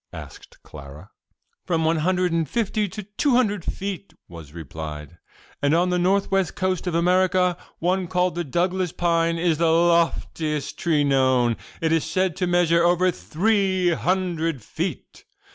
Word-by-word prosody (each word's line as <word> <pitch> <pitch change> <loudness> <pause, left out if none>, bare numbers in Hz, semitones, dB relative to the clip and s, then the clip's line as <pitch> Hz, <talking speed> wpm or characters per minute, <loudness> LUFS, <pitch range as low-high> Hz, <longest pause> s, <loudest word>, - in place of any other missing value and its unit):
asked - - -11
Clara. 75 +5 -12 0.5
"From 165 -2 0
one 165 +1 +2
hundred 180 +2 +1
and 165 -3 -1
fifty 215 -1 -1
to 210 +2 -7
two 225 +7 0
hundred 210 -7 +1
feet," 195 +1 -5
was 80 -4 -11
replied, 80 0 -8 0.4
"and 145 +2 +2
on 180 +2 +2
the 180 - +1
north 195 +3 +1
west 195 -2 0
coast 185 -1 -2
of 175 - -1
America 180 +1 +2 0.2
one 180 +2 0
called 180 0 0
the 175 - -3
'Douglas's 175 +4 -1
pine' 170 -1 +1
is 165 -2 0
the 165 -1 +3
loftiest 165 -3 0
tree 155 -4 +1
known; 130 -4 +2 0.3
it 160 -1 +1
is 165 -1 +2
said 180 +1 -1
to 180 - 0
measure 170 -1 +3
over 180 +1 +3
three 190 0 0
hundred 165 - -1
feet. - - -5
175 Hz, 155 wpm, -23 LUFS, 155-185 Hz, 0.5 s, the